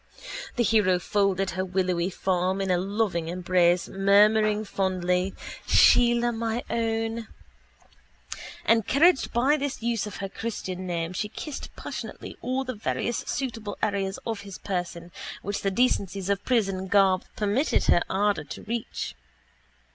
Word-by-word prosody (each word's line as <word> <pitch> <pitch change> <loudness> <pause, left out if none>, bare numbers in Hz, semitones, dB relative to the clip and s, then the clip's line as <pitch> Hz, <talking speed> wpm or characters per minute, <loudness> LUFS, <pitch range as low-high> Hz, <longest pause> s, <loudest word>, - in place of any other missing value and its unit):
The 240 - +2
hero 205 -5 +3
folded 195 0 +1
her 185 +1 -2
willowy 185 -1 0
form 185 0 0
in 195 -1 0
a 180 - +3
loving 195 -3 -1
embrace 175 0 +2
murmuring 210 +2 +4
fondly 185 -1 0 0.3
Sheila, 240 0 +5
my 230 +1 -2
own. 225 0 -1 1.4
Encouraged 270 - +4
by 265 +6 +3
this 275 -5 -4
use 230 -3 0
of 210 - -7
her 195 +2 -4
christian 190 -3 -5
name 170 0 -2
she 210 +3 -2
kissed 300 +5 -6
passionately - - -7
all 260 +1 -1
the 255 -1 -4
various 225 +2 -2
suitable 225 -6 -3
areas 200 -2 0
of 225 -3 -3
his 200 -2 -9
person 175 -2 -4 0.3
which 205 +1 -3
the 195 - +1
decencies 195 -4 0
of 200 0 -1
prison 195 -6 0
garb 190 -1 +4
permitted 215 +9 +1
her 175 - +4
ardour 205 +1 +1
to - - -8
reach. 230 +1 -4
200 Hz, 135 wpm, -26 LUFS, 185-225 Hz, 1.4 s, Sheila